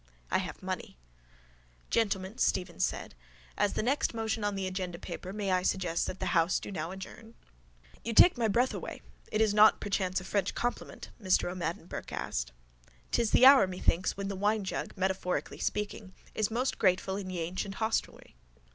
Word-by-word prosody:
I - - +3
have - - -6
money. - - -5 0.9
—Gentlemen, 200 -1 0
Stephen 180 -2 0
said. - - -1 0.4
As 205 0 +1
the - - -1
next 260 0 +1
motion 220 -1 -2
on 205 -1 0
the 195 -1 -2
agenda 185 -2 -3
paper 180 +1 -7
may 200 -1 -2
I 185 0 +3
suggest 180 -2 0
that 185 - -5
the - - -2
house 170 +1 +3
do - - -8
now 165 -3 -3
adjourn? 190 +4 -10 0.7
—You 230 - -2
take 350 +10 +8
my 235 -2 +1
breath 240 +5 +2
away. - - -6 0.3
It 215 - +1
is 215 -2 +3
not 215 +1 +6
perchance 190 -2 -1
a - - -10
French 190 0 -1
compliment? 245 0 -4
Mr 185 -2 +2
O'Madden 170 -2 -4
Burke - - -7
asked. - - -3 0.6
'Tis 230 -2 +2
the 255 - +6
hour, 265 -8 +9
methinks, 185 0 0
when 200 0 -3
the 200 - -3
winejug, 205 0 -1
metaphorically 185 -1 -1
speaking, 210 -2 -3 0.2
is 215 -2 0
most 245 +4 -1
grateful 190 0 +2
in 195 -2 -5
Ye 180 -2 -3
ancient 185 +4 -3
hostelry. 220 +1 -2
195 Hz, 175 wpm, -30 LUFS, 185-215 Hz, 0.9 s, hour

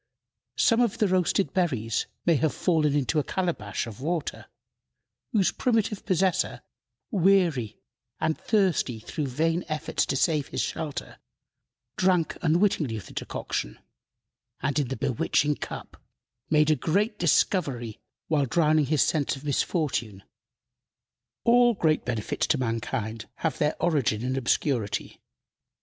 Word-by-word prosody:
Some 230 0 +4
of 235 -3 +1
the 215 -3 +2
roasted 185 +1 +1
berries 125 - 0 0.2
may 170 - +5
have 155 +1 0
fallen 155 -5 +2
into 145 +2 +1
a - - 0
calabash 165 - -2
of 115 0 -9
water, 165 +2 -3 0.8
whose 205 -6 +3
primitive 225 -4 0
possessor, 185 0 +1 0.5
weary 175 - +2 0.4
and 160 0 +1
thirsty 185 - +1
through 145 +6 -4
vain 165 +6 0
efforts 155 0 -1
to - - -1
save 150 +1 +1
his - - -3
shelter, 150 -3 -4 0.8
drank 180 -4 +2
unwittingly 160 - +2
of 100 - -8
the - - -12
decoction, - - -4 0.8
and, 140 +2 0
in 140 - 0
the 130 - -4
bewitching 140 +3 +1
cup, - - -8 0.5
made 150 0 +4
a - - +4
great 200 - 0
discovery 140 - +1 0.3
while 145 -4 +1
drowning 155 0 +3
his 150 0 +3
sense 145 -3 0
of 135 - -11
misfortune. 135 - -1 1.2
All 240 0 +5
great 155 -4 +1
benefits 115 -4 -2
to 150 - +2
mankind 115 -2 -3
have 160 - -2
their 150 0 +1
origin 135 -10 +1
in 130 +1 -1
obscurity. 120 -4 -1
155 Hz, 130 wpm, -26 LUFS, 130-180 Hz, 1.2 s, may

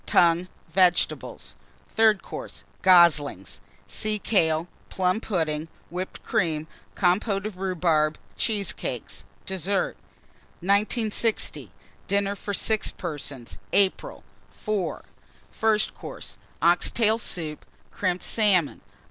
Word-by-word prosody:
Tongue. 170 +1 +4 0.2
Vegetables. 180 +1 +1 0.4
THIRD 220 -2 +3
COURSE. - - -8 0.2
Goslings. 170 - +4 0.2
Sea 215 -1 -1
kale. 165 -6 +1 0.2
Plum 185 +3 0
pudding. 160 -7 -1 0.2
Whipped 180 +2 -5
Cream. 155 -3 0 0.3
Compôte 195 +2 +1
of 215 -4 -5
Rhubarb. 165 -5 +1 0.2
Cheesecakes. 210 -3 -2 0.2
DESSERT. 190 +1 -1 0.7
1960. 215 +3 +1 0.4
DINNER 200 0 +1
FOR 205 - -5
6 220 +1 +1
PERSONS 135 - -6
(April). 195 -2 +1 0.4
IV. 210 -4 -1 0.5
FIRST 215 -1 +1
COURSE. - - -9 0.3
Ox 170 +1 +4
tail 225 -1 +2
Soup. 160 -8 -4 0.3
Crimped 180 -2 -1
Salmon. 195 -8 +3
185 Hz, 95 wpm, -25 LUFS, 165-210 Hz, 0.7 s, Tongue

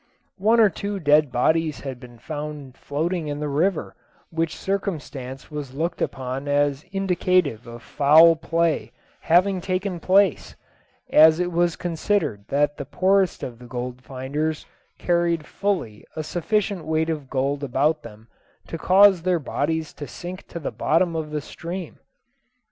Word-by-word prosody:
One 220 +4 +4
or 215 -3 +6
two 200 +4 -4
dead 150 -3 +4
bodies 155 +5 +1
had 130 -3 -6
been 120 -1 -13
found 150 -1 -7
floating 160 +4 -2
in 145 0 -3
the 150 - -2
river, 160 +6 0 0.4
which 165 -1 -1
circumstance 150 -9 -4
was 145 -3 -6
looked 170 +4 -2
upon 130 +1 -3
as 145 0 +1
indicative 180 - +1
of 120 0 -10
foul 160 +4 +6
play 165 0 -1 0.3
having 185 +3 +3
taken 185 0 -2
place, 190 0 +2 0.6
as 160 +1 +7
it 180 0 0
was 170 0 +1
considered 165 - -1
that 145 +1 +1
the 140 - -5
poorest 190 +5 +1
of 120 -2 -6
the 125 - -12
gold 125 +1 -5
finders 140 +5 -3 0.3
carried 170 -2 +1
fully 175 - -2
a 155 - -3
sufficient 195 +2 -1
weight 160 +1 0
of 150 -4 -5
gold 140 +2 -1
about 145 +4 +1
them 110 0 -13 0.4
to 165 - -5
cause 190 +1 +6
their 180 0 +1
bodies 160 +1 -2
to 145 - -8
sink 180 +1 -8
to - - -8
the 150 - -4
bottom 165 +2 +1
of 155 -1 -3
the 150 0 -3
stream. 170 +3 -7
160 Hz, 150 wpm, -23 LUFS, 140-180 Hz, 0.6 s, as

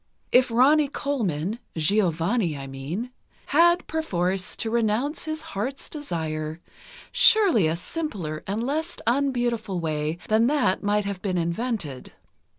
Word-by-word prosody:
If 250 +1 +5
Ronnie 280 +6 +5
Colman—Giovanni, 190 - 0
I 135 - -6
mean—had, 240 - 0
perforce, 190 - -1
to 225 - -3
renounce 235 +7 0
his 310 0 -4
heart's 250 +8 -4
desire, 160 - -4 0.5
surely 395 - +5
a 160 - 0
simpler 175 - -4
and 205 +4 -1
less 315 +5 -2
unbeautiful 240 -6 0
way 155 0 -2
than 220 +2 +4
that 275 -9 +2
might 205 0 +1
have 200 -2 -4
been 185 -2 -1
invented. 170 - -3
215 Hz, 115 wpm, -25 LUFS, 170-275 Hz, 0.5 s, If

